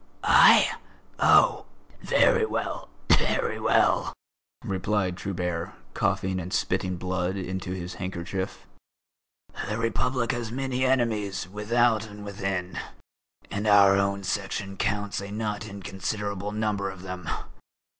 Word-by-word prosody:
"I? -, -, +7 dB, 0.5 s
Oh! -, -, +5 dB, 0.3 s
Very -, -, +4 dB
well, -, -, -3 dB, 0.2 s
very -, -, +2 dB
well!" -, -, +2 dB, 0.5 s
replied 95 Hz, -1 st, -1 dB
Trubert, 90 Hz, -3 st, -3 dB, 0.2 s
coughing 95 Hz, 0 st, 0 dB
and 90 Hz, +1 st, -6 dB
spitting 90 Hz, -1 st, 0 dB
blood 95 Hz, +1 st, -2 dB
into 95 Hz, -1 st, -4 dB
his 90 Hz, -1 st, -5 dB
handkerchief. 95 Hz, +1 st, -5 dB, 1.0 s
"The 105 Hz, -, -1 dB
Republic 120 Hz, +2 st, 0 dB
has 120 Hz, -3 st, -4 dB
many 130 Hz, 0 st, -1 dB
enemies 110 Hz, -8 st, 0 dB
without 110 Hz, +3 st, +1 dB
and 105 Hz, 0 st, -10 dB
within, 95 Hz, -2 st, -3 dB, 0.7 s
and 105 Hz, +2 st, -2 dB
our 100 Hz, -2 st, +7 dB
own 100 Hz, 0 st, 0 dB
Section 95 Hz, +1 st, -3 dB
counts 100 Hz, 0 st, -1 dB
a 100 Hz, -, -7 dB
not 105 Hz, +1 st, -3 dB
inconsiderable 100 Hz, 0 st, -4 dB
number 105 Hz, -2 st, -1 dB
of 95 Hz, -1 st, -9 dB
them. 90 Hz, -2 st, -6 dB
100 Hz, 115 wpm, -26 LUFS, 95-105 Hz, 1.0 s, I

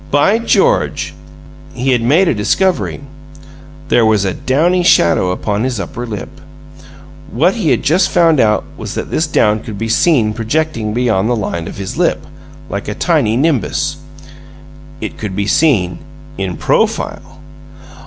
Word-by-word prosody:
"By 170 Hz, +10 st, +3 dB
George!" 195 Hz, -, +1 dB, 0.6 s
He 130 Hz, +2 st, 0 dB
had 120 Hz, -2 st, +2 dB
made 155 Hz, +11 st, +3 dB
a -, -, +2 dB
discovery. 170 Hz, -, 0 dB, 0.9 s
There 120 Hz, -, +4 dB
was 110 Hz, -3 st, +2 dB
a 95 Hz, -, -1 dB
downy 170 Hz, +7 st, +1 dB
shadow 90 Hz, -, +3 dB
upon 100 Hz, +3 st, -2 dB
his 125 Hz, -4 st, -2 dB
upper 120 Hz, +6 st, -5 dB
lip. 115 Hz, +5 st, -8 dB, 0.9 s
What 165 Hz, +10 st, +2 dB
he 200 Hz, -9 st, -1 dB
had -, -, +1 dB
just 175 Hz, +4 st, +2 dB
found 165 Hz, -4 st, +3 dB
out 105 Hz, -2 st, +2 dB
was -, -, -6 dB
that -, -, -5 dB
this 155 Hz, -, 0 dB
down 105 Hz, -7 st, +2 dB
could 105 Hz, -2 st, -8 dB
be 115 Hz, +2 st, -3 dB
seen 115 Hz, -4 st, +2 dB
projecting 115 Hz, -1 st, -2 dB
beyond 115 Hz, -4 st, +1 dB
the 120 Hz, -, +2 dB
line 85 Hz, -6 st, -3 dB
of -, -, -8 dB
his 95 Hz, -1 st, -5 dB
lip, -, -, 0 dB, 0.4 s
like -, -, -5 dB
a -, -, -3 dB
tiny 110 Hz, +2 st, +1 dB
nimbus. 145 Hz, 0 st, 0 dB, 1.0 s
It -, -, -6 dB
could 100 Hz, -4 st, -5 dB
be 100 Hz, 0 st, -1 dB
seen 110 Hz, -, +2 dB, 0.4 s
in 95 Hz, -6 st, -4 dB
PROFILE. -, -, -1 dB
120 Hz, 155 wpm, -15 LUFS, 105-155 Hz, 1.0 s, There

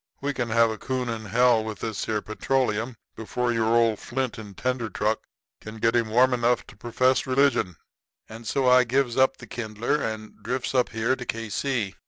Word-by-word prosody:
'We 145 Hz, +1 st, -2 dB
can 120 Hz, -3 st, -2 dB
have 115 Hz, 0 st, +4 dB
a 110 Hz, -, -6 dB
coon 130 Hz, -2 st, -2 dB
in 110 Hz, -1 st, -4 dB
hell 120 Hz, +1 st, +3 dB
with 110 Hz, -2 st, -5 dB
this 110 Hz, -3 st, -3 dB
here 105 Hz, -2 st, -1 dB
petroleum 115 Hz, +1 st, -1 dB, 0.2 s
before 120 Hz, +2 st, -2 dB
your 115 Hz, -1 st, +1 dB
old 115 Hz, -2 st, +3 dB
flint 130 Hz, -1 st, -3 dB
and 100 Hz, -4 st, -10 dB
tinder 125 Hz, -3 st, -1 dB
truck 110 Hz, +1 st, 0 dB, 0.4 s
can 110 Hz, +1 st, -9 dB
get 115 Hz, +2 st, +2 dB
him 115 Hz, -2 st, +2 dB
warm 125 Hz, +3 st, +4 dB
enough 120 Hz, 0 st, +1 dB
to -, -, -15 dB
perfess 125 Hz, +4 st, +1 dB
religion.' 130 Hz, -9 st, +2 dB, 0.5 s
And 115 Hz, +1 st, -10 dB
so 135 Hz, +2 st, +1 dB
I 125 Hz, 0 st, +7 dB
gives 125 Hz, 0 st, 0 dB
up 130 Hz, 0 st, +3 dB
the 120 Hz, -, -11 dB
kindler 115 Hz, +4 st, -2 dB
and 110 Hz, -1 st, -5 dB
drifts 125 Hz, +4 st, -3 dB
up 125 Hz, -2 st, +2 dB
here 115 Hz, +4 st, 0 dB
to 125 Hz, -, -7 dB
K.C. 115 Hz, -1 st, -2 dB
115 Hz, 195 wpm, -25 LUFS, 110-125 Hz, 0.5 s, I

